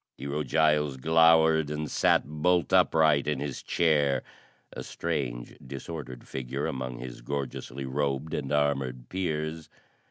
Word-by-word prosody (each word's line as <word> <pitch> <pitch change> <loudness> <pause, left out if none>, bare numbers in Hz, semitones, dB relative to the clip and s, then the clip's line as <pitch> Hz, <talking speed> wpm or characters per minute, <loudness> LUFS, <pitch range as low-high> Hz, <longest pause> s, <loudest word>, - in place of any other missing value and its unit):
Hero 70 +2 -3
Giles 75 -3 +2
glowered 80 +1 +4
and 75 0 -3
sat - - +3
bolt 85 +4 +1
upright 80 -3 +4
in 75 -3 0
his 70 -3 -4
chair 75 -5 +2 0.5
a - - -6
strange 65 -8 -4
disordered 65 -1 -8
figure 65 -2 -4
among 65 -2 -4
his - - -8
gorgeously 70 0 -5
robed 70 +2 -2
and 70 -2 -3
armored 70 -4 0
peers. 80 -3 -3
75 Hz, 125 wpm, -28 LUFS, 65-80 Hz, 0.5 s, glowered